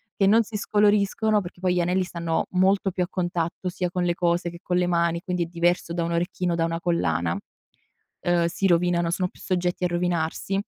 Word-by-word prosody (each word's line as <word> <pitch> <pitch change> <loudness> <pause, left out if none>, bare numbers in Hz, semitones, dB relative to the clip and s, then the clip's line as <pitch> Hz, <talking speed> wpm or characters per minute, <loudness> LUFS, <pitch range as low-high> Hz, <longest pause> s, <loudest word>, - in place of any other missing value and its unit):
che 195 - +2
non 225 +4 +5
si 215 0 -10
scoloriscono, 210 +1 +2
perché 175 -1 -10
poi 185 -1 +1
gli 180 - +1
anelli 180 +2 +1
stanno 170 -2 -2
molto 195 +1 +2
più 180 0 -1
a - - -3
contatto 175 0 -2
sia 180 0 -2
con 180 -1 -1
le 175 - +2
cose 175 -1 0
che 170 0 -11
con 180 0 0
le 180 0 +2
mani, 170 -1 +1
quindi 180 -1 -1
è - - -2
diverso 170 0 0
da 170 0 -1
un 170 - -2
orecchino, 175 0 -1
da 165 - 0
una 165 0 -1
collana, 170 - 0 0.8
uhm, 175 -1 +2
si 180 +3 0
rovinano, 175 0 +2
sono 180 +2 0
più - - -21
soggetti 180 -1 -1
a 180 - +2
rovinarsi. 175 +1 -1
175 Hz, 215 wpm, -25 LUFS, 170-185 Hz, 0.8 s, non